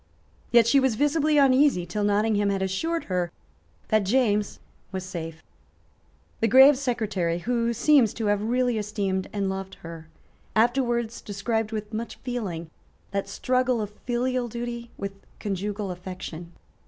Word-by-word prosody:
Yet 235 Hz, -2 st, +6 dB
she 275 Hz, +4 st, +5 dB
was 265 Hz, -4 st, +2 dB
visibly 295 Hz, +3 st, +2 dB
uneasy 270 Hz, -8 st, +4 dB
till 205 Hz, +5 st, -3 dB
Nottingham 205 Hz, 0 st, +2 dB
had 195 Hz, -1 st, 0 dB
assured 325 Hz, -, -1 dB
her 180 Hz, -2 st, -1 dB, 0.6 s
that 215 Hz, -2 st, +3 dB
James 210 Hz, -1 st, +1 dB, 0.3 s
was 190 Hz, -1 st, -4 dB
safe. 165 Hz, -3 st, -7 dB, 1.0 s
The 225 Hz, -, +2 dB
grave 265 Hz, +5 st, +8 dB
Secretary, 215 Hz, -10 st, -1 dB
who 235 Hz, +5 st, 0 dB
seems 240 Hz, -1 st, +4 dB
to 225 Hz, -, -3 dB
have 205 Hz, 0 st, +2 dB
really 245 Hz, +1 st, +1 dB
esteemed 200 Hz, -3 st, -2 dB
and 200 Hz, -2 st, -1 dB
loved 190 Hz, 0 st, -4 dB
her, 165 Hz, -1 st, -9 dB, 0.5 s
afterwards 235 Hz, 0 st, +1 dB
described 215 Hz, +2 st, -2 dB
with 215 Hz, 0 st, -5 dB
much 230 Hz, +2 st, -4 dB
feeling 190 Hz, -11 st, -4 dB, 0.4 s
that 200 Hz, 0 st, -2 dB
struggle 255 Hz, +2 st, +1 dB
of 210 Hz, -1 st, -3 dB, 0.2 s
filial 250 Hz, 0 st, 0 dB
duty 235 Hz, 0 st, -5 dB
with 200 Hz, 0 st, -4 dB, 0.3 s
conjugal 200 Hz, 0 st, -3 dB
affection. 180 Hz, -2 st, -8 dB
215 Hz, 140 wpm, -26 LUFS, 195-245 Hz, 1.0 s, grave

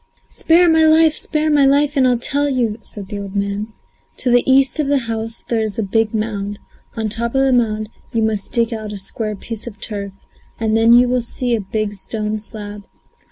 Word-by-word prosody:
"Spare 345 Hz, +2 st, +3 dB
my 320 Hz, -1 st, +4 dB
life, 315 Hz, 0 st, +5 dB
spare 310 Hz, 0 st, -1 dB
my 290 Hz, -1 st, +4 dB
life, 285 Hz, +2 st, +3 dB
and 265 Hz, -2 st, +4 dB
I'll 250 Hz, -1 st, +3 dB
tell 285 Hz, +4 st, 0 dB
you!" 235 Hz, -5 st, -1 dB
said 200 Hz, -3 st, -10 dB
the 205 Hz, -, -5 dB
old 200 Hz, 0 st, -7 dB
man. 200 Hz, +1 st, -2 dB, 0.5 s
"To 250 Hz, -, +1 dB
the 245 Hz, 0 st, +5 dB
east 270 Hz, +1 st, +4 dB
of 300 Hz, -, +1 dB
the 285 Hz, 0 st, +3 dB
house 225 Hz, 0 st, -4 dB
there 230 Hz, -2 st, 0 dB
is 215 Hz, -3 st, -3 dB
a 225 Hz, -, 0 dB
big 215 Hz, +2 st, +1 dB
mound; 205 Hz, -2 st, -3 dB, 0.4 s
on 220 Hz, -1 st, -2 dB
top 235 Hz, +3 st, -3 dB
of 270 Hz, -, +3 dB
the 265 Hz, -1 st, +3 dB
mound 215 Hz, -3 st, +1 dB, 0.2 s
you 225 Hz, -1 st, 0 dB
must 215 Hz, -2 st, -1 dB
dig 235 Hz, -1 st, +1 dB
out 215 Hz, -2 st, -5 dB
a 205 Hz, -, -5 dB
square 210 Hz, +2 st, -3 dB
piece 225 Hz, +3 st, -7 dB
of 210 Hz, -4 st, -9 dB
turf, 200 Hz, -2 st, -5 dB, 0.5 s
and 220 Hz, -1 st, +1 dB
then 225 Hz, +1 st, +5 dB
you 245 Hz, +1 st, +6 dB
will 250 Hz, 0 st, +1 dB
see 240 Hz, +1 st, -1 dB
a 220 Hz, -, -2 dB
big 205 Hz, +1 st, -3 dB
stone 215 Hz, +1 st, -3 dB
slab. 210 Hz, -1 st, -8 dB
225 Hz, 215 wpm, -18 LUFS, 210-255 Hz, 0.5 s, you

